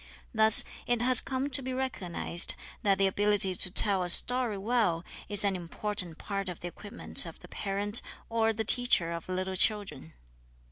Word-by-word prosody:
Thus 220 -1 +7 0.2
it 240 -1 0
has 255 0 +6
come 270 +2 -4
to 270 - +5
be 260 0 -5
recognized 190 -9 -2 0.3
that 195 -2 +1
the 195 - +2
ability 200 0 0
to 185 - +3
tell 195 0 +2
a 180 - -3
story 245 +3 +4
well 195 -5 -1 0.2
is 205 -1 -4
an 200 -1 0
important 180 0 -5
part 195 -2 -5
of 175 - -9
the 175 - -6
equipment 205 +6 -1
of - - -11
the - - -13
parent 205 +2 -2 0.3
or 225 -1 0
the 220 0 -4
teacher 245 -9 +1
of 170 +1 -7
little 185 +1 -4
children. 200 - +1
205 Hz, 175 wpm, -28 LUFS, 185-230 Hz, 0.3 s, Thus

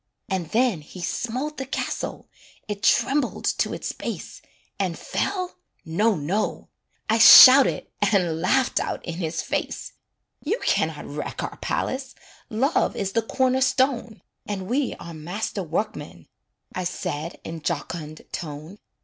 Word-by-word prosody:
And 185 -4 -2
then 230 -8 +2
he 165 +5 -12
smote 250 - -3
the 265 - -4
castle, - - -4 0.4
It 205 -1 -4
trembled 265 +5 +2
to - - +1
its - - -4
base, - - -7 0.4
And - - -1
fell? 365 -2 -3 0.3
No, 205 +7 +2
no 180 +8 -2 0.4
I 225 +1 +2
shouted 260 +3 +10 0.3
And 175 -6 +1
laughed 255 +8 +2
out - - -4
in 170 -2 -5
his 165 -2 -2
face: - - -3 0.5
"You 415 +11 -1
can - - +3
not - - -8
wreck - - -5
our - - -5
palace, 265 0 -3 0.3
Love 260 +8 +1
is 195 -1 -2
the 230 - +1
corner 260 +3 +1
stone, 260 -4 +1 0.2
And 195 -2 -4
we 260 +4 0
are 170 - -9
master 180 +6 -4
workmen," 175 +5 -4 0.5
I 185 - -3
said, 160 -2 -4
in 165 -1 -7
jocund 155 0 -4
tone. 155 +5 -7
210 Hz, 140 wpm, -24 LUFS, 170-260 Hz, 0.5 s, shouted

